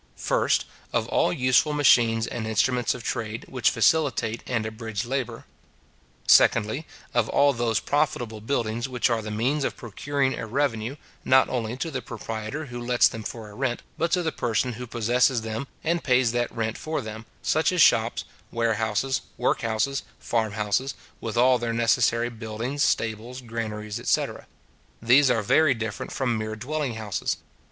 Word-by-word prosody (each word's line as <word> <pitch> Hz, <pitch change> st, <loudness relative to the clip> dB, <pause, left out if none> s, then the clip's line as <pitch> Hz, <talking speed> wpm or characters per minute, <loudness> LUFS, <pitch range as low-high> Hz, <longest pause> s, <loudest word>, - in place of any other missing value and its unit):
First, -, -, +1 dB, 0.3 s
of -, -, 0 dB
all -, -, +2 dB
useful 130 Hz, 0 st, +3 dB
machines 115 Hz, -6 st, +4 dB
and 110 Hz, -2 st, -4 dB
instruments 120 Hz, +3 st, +1 dB
of 125 Hz, -, -8 dB
trade, 110 Hz, -2 st, -3 dB
which 125 Hz, -3 st, +2 dB
facilitate 115 Hz, -2 st, +1 dB
and 115 Hz, -3 st, -1 dB
abridge 110 Hz, -1 st, -4 dB
labour. 130 Hz, -1 st, -3 dB, 0.8 s
Secondly, 120 Hz, +7 st, +4 dB, 0.3 s
of 120 Hz, -3 st, +2 dB
all 140 Hz, 0 st, +4 dB
those 115 Hz, -2 st, 0 dB
profitable 120 Hz, -6 st, -1 dB
buildings 120 Hz, 0 st, -1 dB
which 125 Hz, -1 st, +1 dB
are 115 Hz, -1 st, +1 dB
the 110 Hz, -, -6 dB
means 125 Hz, +8 st, 0 dB
of -, -, -2 dB
procuring 135 Hz, +4 st, -1 dB
a 115 Hz, -, -5 dB
revenue, 120 Hz, -1 st, -1 dB, 0.3 s
not 130 Hz, 0 st, +4 dB
only 120 Hz, -1 st, -2 dB
to 160 Hz, +4 st, -3 dB
the 130 Hz, -3 st, -3 dB
proprietor 115 Hz, +6 st, -5 dB
who 120 Hz, -3 st, -7 dB
lets 120 Hz, 0 st, +4 dB
them 110 Hz, -, -6 dB
for 110 Hz, -1 st, -7 dB
a -, -, -13 dB
rent, 125 Hz, +1 st, -2 dB
but 170 Hz, +1 st, -1 dB
to 180 Hz, -, +2 dB
the 160 Hz, -, 0 dB
person 120 Hz, 0 st, -1 dB
who 125 Hz, +2 st, -7 dB
possesses 120 Hz, +2 st, +2 dB
them, 110 Hz, +4 st, -4 dB, 0.2 s
and 170 Hz, +1 st, 0 dB
pays 125 Hz, -3 st, +3 dB
that 120 Hz, 0 st, -1 dB
rent 115 Hz, -1 st, -3 dB
for 155 Hz, -2 st, -2 dB
them; 110 Hz, 0 st, -8 dB, 0.2 s
such -, -, +2 dB
as -, -, -1 dB
shops, -, -, +4 dB, 0.3 s
warehouses, 115 Hz, +2 st, 0 dB, 0.2 s
work 125 Hz, -, +1 dB
houses, 115 Hz, +4 st, 0 dB, 0.2 s
farm 110 Hz, -3 st, -1 dB
houses, 105 Hz, +6 st, -1 dB, 0.2 s
with 115 Hz, 0 st, -4 dB
all 125 Hz, +1 st, +5 dB
their 115 Hz, 0 st, -2 dB
necessary 115 Hz, +1 st, +2 dB
buildings, 115 Hz, +5 st, -4 dB
stables, 115 Hz, -2 st, 0 dB
granaries, 110 Hz, -3 st, -5 dB
etc. -, -, -1 dB, 0.5 s
These 130 Hz, +4 st, +5 dB
are 115 Hz, -3 st, +2 dB
very 150 Hz, +5 st, +4 dB
different 110 Hz, -3 st, -5 dB
from 120 Hz, -4 st, -1 dB
mere 110 Hz, 0 st, -3 dB
dwelling 135 Hz, +2 st, -3 dB
houses. 110 Hz, -3 st, -2 dB
120 Hz, 165 wpm, -25 LUFS, 110-130 Hz, 0.8 s, all